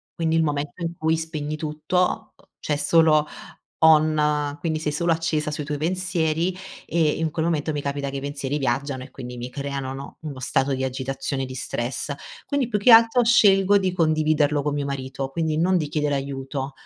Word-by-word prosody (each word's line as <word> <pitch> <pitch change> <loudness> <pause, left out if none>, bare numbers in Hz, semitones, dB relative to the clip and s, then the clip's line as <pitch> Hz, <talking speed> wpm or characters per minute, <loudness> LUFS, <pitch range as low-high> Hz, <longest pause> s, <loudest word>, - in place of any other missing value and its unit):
Quindi 165 -2 0
il 160 - +3
momento 145 +1 -2
in 170 0 -3
cui 160 +1 +1
spegni 155 -2 -4
tutto, 155 +4 -1 0.3
c'è 150 - -1
solo 155 -1 +4 0.6
on 150 -2 +3
quindi 160 -2 -1
sei 155 - -1
solo 170 +3 +1
accesa 160 -2 -1
sui 150 0 -4
tuoi 150 +1 -3
pensieri 175 0 0 0.3
e 160 -2 +2
in 160 -1 0
quel 160 +1 -2
momento 155 -2 0
mi 145 -1 -3
capita 140 0 -3
che 140 - -5
i - - -3
pensieri 140 0 -3
viaggiano 135 0 -1
e - - -14
quindi 125 -2 -8
mi 120 +1 -6
creano, 140 0 -4
no, 135 +1 -9
uno 145 -4 -7
stato 135 +2 0
di 130 - -3
agitazione 135 +1 -3
di 130 - -8
stress, 125 +2 -3 0.3
quindi 280 -4 0
più 210 - 0
che 205 +5 +4
altro 230 +2 +7
scelgo 205 -4 +5
di 190 -2 0
condividerlo 155 -3 +2
con 150 - -1
mio 145 -1 -2
marito, 135 -1 -4
quindi 160 +1 -1
non 185 +3 +3
di 155 -3 -2
chiedere 150 -1 0
aiuto, 135 0 -4
150 Hz, 190 wpm, -23 LUFS, 140-165 Hz, 0.6 s, altro